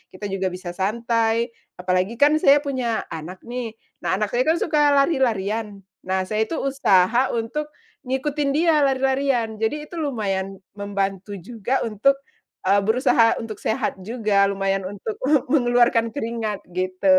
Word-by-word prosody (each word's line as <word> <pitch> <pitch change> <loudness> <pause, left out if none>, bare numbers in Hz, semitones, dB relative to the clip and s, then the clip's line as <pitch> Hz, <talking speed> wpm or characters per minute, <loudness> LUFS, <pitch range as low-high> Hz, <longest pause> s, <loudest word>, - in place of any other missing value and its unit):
kita 200 +1 -5
juga 190 -1 -1
bisa 180 -1 -5
santai. 230 +4 0 0.2
Apalagi 185 +4 0
kan, 295 +5 +4
saya 285 +1 +5
punya 255 -5 -1
anak 165 +3 -7
nih. 240 -2 -5 0.2
Nah, - - 0
anak 210 +1 -1
saya 250 +3 +1
kan, 320 - +4
suka 295 -3 +3
lari-larian. 220 - 0 0.2
Nah, 190 0 +1
saya 215 +3 -1
itu 330 - -3
usaha 245 -3 +3
untuk 295 +7 -2 0.4
ngikutin 280 +2 -1
dia 320 -1 +4
lari-larian. 265 -4 +1
Jadi, 295 +8 -1
itu 340 - -5
lumayan 195 -8 -2 0.2
membantu 200 0 -3
juga 225 +6 -2
untuk, 230 +6 +2 0.5
eee, 200 +2 +4
berusaha 230 +2 +3
untuk 225 -2 -7
sehat 220 -4 -1
juga. 205 -2 +1
Lumayan 195 0 0
untuk 205 +2 -5 0.2
me 295 -3 +3
mengeluarkan 245 -4 +3
keringat, 225 -5 -4
gitu. 185 +1 -3
225 Hz, 145 wpm, -23 LUFS, 195-265 Hz, 0.5 s, saya